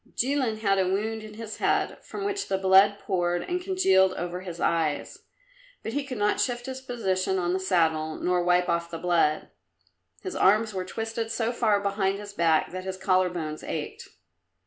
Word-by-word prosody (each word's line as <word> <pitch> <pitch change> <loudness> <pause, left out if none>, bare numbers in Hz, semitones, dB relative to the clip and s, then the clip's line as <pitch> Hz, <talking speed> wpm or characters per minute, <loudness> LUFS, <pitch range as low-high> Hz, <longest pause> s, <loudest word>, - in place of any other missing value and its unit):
Jilin 250 -4 0
had 195 -2 +2
a 185 - +2
wound 215 +4 -1
in 215 0 -10
his 225 -1 -7
head, - - 0
from 400 - -6
which 400 0 -2
the 190 - 0
blood 190 +2 +5
poured 175 -3 -1
and 360 0 -2
congealed 190 - +3
over 180 0 -4
his 175 -2 -8
eyes, 160 -4 -1 0.6
but 220 - -4
he 285 +1 -1
could 265 -3 -6
not 210 0 +1
shift 245 -1 -1
his 260 0 -6
position 190 -7 -1
on 175 -1 0
the 190 - 0
saddle, 160 -4 +1
nor 180 0 0
wipe 180 0 +3
off 170 0 -1
the 165 - -5
blood. 165 -3 +1 0.7
His 375 - -5
arms 215 +3 +3
were 185 -1 -3
twisted 225 +3 -4
so 225 +1 -1
far 220 -4 +2
behind 200 -1 0
his 205 0 -9
back 165 -4 +2
that 185 +1 -5
his 190 0 -4
collar 185 -1 +2
bones 155 -3 -5
ached. - - -5
190 Hz, 190 wpm, -26 LUFS, 180-225 Hz, 0.7 s, blood